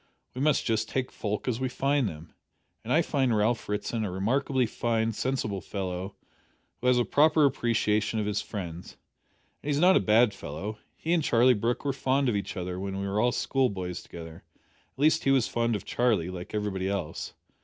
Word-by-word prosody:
We 125 Hz, -, -5 dB
must 150 Hz, -1 st, +2 dB
just 110 Hz, -1 st, 0 dB
take 130 Hz, -1 st, -2 dB
folk 105 Hz, +2 st, -3 dB
as 120 Hz, -2 st, 0 dB
we 130 Hz, -1 st, -1 dB
find 135 Hz, -2 st, +1 dB
them, 80 Hz, -1 st, -11 dB, 0.5 s
and -, -, -5 dB
I -, -, +4 dB
find 130 Hz, -5 st, +1 dB
Ralph 110 Hz, +2 st, 0 dB
Ritson 105 Hz, +2 st, -2 dB
a 105 Hz, -, -2 dB
remarkably 125 Hz, +7 st, +1 dB
fine, 115 Hz, 0 st, 0 dB
sensible 110 Hz, -5 st, -2 dB
fellow, 95 Hz, +1 st, -4 dB, 0.6 s
who 125 Hz, -, -2 dB
has 125 Hz, -1 st, +5 dB
a 120 Hz, -, +2 dB
proper 155 Hz, +1 st, +4 dB
appreciation 110 Hz, -4 st, +1 dB
of 105 Hz, -, -1 dB
his 105 Hz, 0 st, -1 dB
friends. 90 Hz, -4 st, -7 dB, 0.6 s
And 145 Hz, -, -5 dB
he's 145 Hz, 0 st, +1 dB
not 185 Hz, +3 st, +6 dB
a -, -, +6 dB
bad 110 Hz, 0 st, +4 dB
fellow. 100 Hz, +5 st, -6 dB, 0.2 s
He 165 Hz, -, -1 dB
and 170 Hz, -, +3 dB
Charlie 125 Hz, -2 st, +4 dB
Brooke 120 Hz, +5 st, -1 dB
were 140 Hz, -, +1 dB
fond 135 Hz, 0 st, +1 dB
of 115 Hz, -, 0 dB
each 100 Hz, -, -3 dB
other 90 Hz, 0 st, -4 dB
when 95 Hz, 0 st, -4 dB
we 100 Hz, -, -2 dB
were 100 Hz, +2 st, -1 dB
all 120 Hz, +1 st, +3 dB
schoolboys 95 Hz, -11 st, -1 dB
together 80 Hz, -2 st, -10 dB, 0.5 s
at -, -, -46 dB
least 155 Hz, +2 st, +3 dB
he -, -, +3 dB
was 135 Hz, -4 st, +4 dB
fond 115 Hz, -1 st, 0 dB
of 105 Hz, -, -5 dB
Charlie, 110 Hz, -8 st, +1 dB
like 90 Hz, +3 st, -7 dB
everybody 95 Hz, -3 st, -1 dB
else. 90 Hz, -5 st, -4 dB
110 Hz, 195 wpm, -28 LUFS, 100-130 Hz, 0.6 s, not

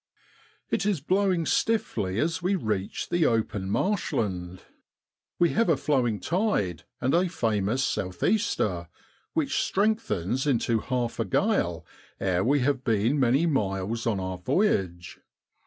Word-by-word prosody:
103 205 Hz, -, +1 dB
It -, -, +4 dB
is 185 Hz, -, -2 dB
blowing 185 Hz, +2 st, +1 dB
stiffly 110 Hz, -, 0 dB
as 170 Hz, +4 st, 0 dB
we 185 Hz, +3 st, +1 dB
reach 105 Hz, -, -2 dB
the 175 Hz, -2 st, +3 dB
open 105 Hz, -4 st, -1 dB
marshland; 100 Hz, -, -1 dB, 0.7 s
we 175 Hz, -1 st, +4 dB
have 230 Hz, -2 st, +1 dB
a 160 Hz, -, +4 dB
flowing 125 Hz, -8 st, +1 dB
tide 160 Hz, -, -1 dB
and 130 Hz, +2 st, 0 dB
a 180 Hz, +2 st, +3 dB
famous 115 Hz, -, 0 dB
south 95 Hz, -7 st, -2 dB
easter, 220 Hz, 0 st, +1 dB, 0.5 s
which 310 Hz, -4 st, 0 dB
strengthens 140 Hz, -, 0 dB
into 115 Hz, -4 st, +2 dB
half 125 Hz, 0 st, -2 dB
a -, -, +1 dB
gale 85 Hz, -, 0 dB, 0.3 s
ere 95 Hz, -1 st, +1 dB
we 140 Hz, +4 st, +2 dB
have 130 Hz, 0 st, 0 dB
been 115 Hz, +5 st, +1 dB
many 135 Hz, +5 st, +3 dB
miles 110 Hz, -, -1 dB
on 105 Hz, -4 st, +1 dB
our 95 Hz, -1 st, -4 dB
voyage. 90 Hz, -, 0 dB
125 Hz, 140 wpm, -27 LUFS, -, 0.7 s, It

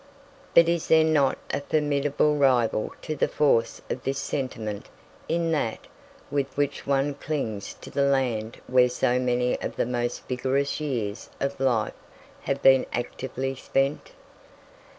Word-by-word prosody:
But 170 Hz, 0 st, +8 dB
is 170 Hz, -1 st, 0 dB
there 160 Hz, 0 st, +6 dB
not 150 Hz, -4 st, +3 dB, 0.2 s
a 140 Hz, -, 0 dB
formidable 145 Hz, 0 st, +1 dB
rival 125 Hz, -6 st, +2 dB
to 155 Hz, -, -3 dB
the -, -, +1 dB
force 115 Hz, -6 st, +1 dB
of 130 Hz, -, -4 dB
this 135 Hz, 0 st, -2 dB
sentiment 115 Hz, -7 st, -4 dB, 0.4 s
in 165 Hz, 0 st, +1 dB
that 115 Hz, -8 st, -1 dB, 0.5 s
with 140 Hz, -2 st, 0 dB
which 145 Hz, -1 st, -1 dB
one 140 Hz, +1 st, +1 dB
clings 135 Hz, -8 st, -4 dB
to -, -, -10 dB
the 140 Hz, -, 0 dB
land 125 Hz, -5 st, 0 dB
where 125 Hz, 0 st, +4 dB
so 125 Hz, 0 st, +1 dB
many 125 Hz, 0 st, 0 dB
of -, -, -4 dB
the -, -, 0 dB
most 120 Hz, 0 st, -3 dB
vigorous 135 Hz, +3 st, 0 dB
years 115 Hz, -8 st, -3 dB
of 140 Hz, 0 st, -2 dB
life 125 Hz, -5 st, +1 dB, 0.5 s
have 140 Hz, 0 st, -2 dB
been 135 Hz, -1 st, +6 dB
actively 130 Hz, +2 st, -3 dB
spent? 135 Hz, +2 st, -1 dB
135 Hz, 145 wpm, -26 LUFS, 125-145 Hz, 0.5 s, But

